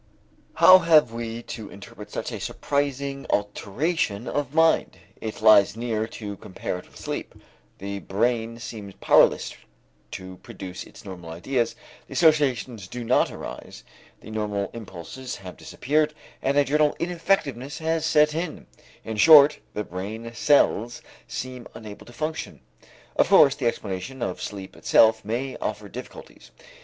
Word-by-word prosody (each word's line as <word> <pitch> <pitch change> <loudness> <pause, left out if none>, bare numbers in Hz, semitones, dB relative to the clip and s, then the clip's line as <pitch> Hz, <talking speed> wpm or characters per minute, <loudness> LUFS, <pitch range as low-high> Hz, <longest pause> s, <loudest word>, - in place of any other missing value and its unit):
How 185 0 +9
have 155 -8 +4
we 115 0 -5
to 110 -3 -7
interpret 100 +1 -11
such - - -4
a - - -5
surprising 140 -1 -2
alteration 105 - -1
of 145 -3 -2
mind? 160 0 +3 0.2
It 110 -1 -7
lies 105 -1 +6
near 115 -2 -2
to 105 -3 -7
compare 90 -1 -5
it - - -15
with - - -17
sleep. - - -5 0.4
The 100 +1 -5
brain 115 +3 -1
seems 110 -4 -8
powerless - - +4 0.6
to 95 0 -8
produce 90 0 -9
its - - -15
normal 90 -4 -9
ideas, 115 +9 -1 0.3
the - - -10
associations 130 - +2
do 120 +5 -6
not 120 +2 +3
arise, - - -9 0.4
the 110 - -11
normal 105 -2 -2
impulses 115 +3 -8
have 90 -2 -10
disappeared 150 +2 -1 0.3
and 140 +1 +1
a 145 - +6
general 150 +1 +2
ineffectiveness 165 -6 -1
has 160 -1 -1
set 150 -1 +4
in; 165 0 -4 0.4
in 110 -1 -4
short, 150 +3 +8 0.2
the 105 - -1
brain 110 +6 -6
cells 120 -2 +2 0.2
seem 130 -1 -6
unable 105 -2 -10
to - - -12
function. 160 +2 -4 0.6
Of - - +3
course, 140 -2 +7
the 140 -4 -2
explanation 115 +4 -4
of 95 - -3
sleep 100 -2 -7
itself 110 0 +4
may 125 +5 -3
offer - - -4
difficulties. - - -11
120 Hz, 145 wpm, -25 LUFS, 105-145 Hz, 0.6 s, How